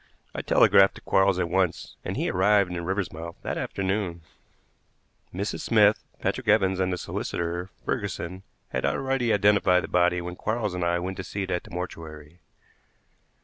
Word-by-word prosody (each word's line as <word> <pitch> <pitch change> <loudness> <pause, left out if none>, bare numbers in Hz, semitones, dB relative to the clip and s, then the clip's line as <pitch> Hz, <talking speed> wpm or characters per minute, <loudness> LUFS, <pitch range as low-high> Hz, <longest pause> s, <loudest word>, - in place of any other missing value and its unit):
I - - -3
telegraphed 95 0 +5
to - - -11
Quarles 95 -1 +3
at 90 -2 0
once, 90 0 -1
and - - -4
he - - 0
arrived 100 0 +3
in 85 -1 -4
Riversmouth 85 -3 -3
that - - -2
afternoon. 95 -3 -2 1.1
Mrs. 100 +3 -3
Smith, 105 -2 +4 0.2
Patrick - - -2
Evans, 95 -3 +3
and 95 0 +1
the 90 - -1
solicitor, 85 +1 -3 0.2
Ferguson, 90 +2 -3 0.3
had - - -3
already 135 -3 0
identified 100 -3 +4
the - - -4
body 90 0 +2
when 90 0 -6
Quarles 110 0 -2
and 90 -1 -2
I 85 0 +2
went 95 +2 -4
to 95 - -4
see 100 +2 -4
it 95 - -5
at 90 - -2
the - - -13
mortuary. 85 -2 -7
95 Hz, 165 wpm, -26 LUFS, 85-100 Hz, 1.1 s, telegraphed